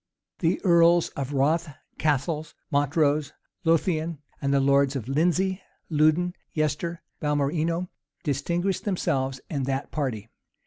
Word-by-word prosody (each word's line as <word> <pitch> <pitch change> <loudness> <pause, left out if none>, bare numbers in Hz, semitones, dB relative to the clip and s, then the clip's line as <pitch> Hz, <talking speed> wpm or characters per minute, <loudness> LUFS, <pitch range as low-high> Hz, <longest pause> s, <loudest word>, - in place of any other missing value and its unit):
The 170 +1 +1
earls 170 -1 +5
of 140 0 -5
Rothes, 155 +5 +2 0.3
Cassils, 155 +1 0 0.2
Montrose, 145 0 +2 0.3
Lothian, 165 -1 +1 0.2
the 140 0 +2
lords 140 0 +3
Lindesey, 175 - +1 0.3
Louden, 155 +4 +3 0.2
Yester, 155 +2 -1 0.2
Balmerino, 155 +4 0 0.4
distinguished 170 +6 -1
themselves 135 - -1
in 145 -3 -2
that 135 +1 -2
party. 125 -8 -2
155 Hz, 100 wpm, -26 LUFS, 140-170 Hz, 0.4 s, earls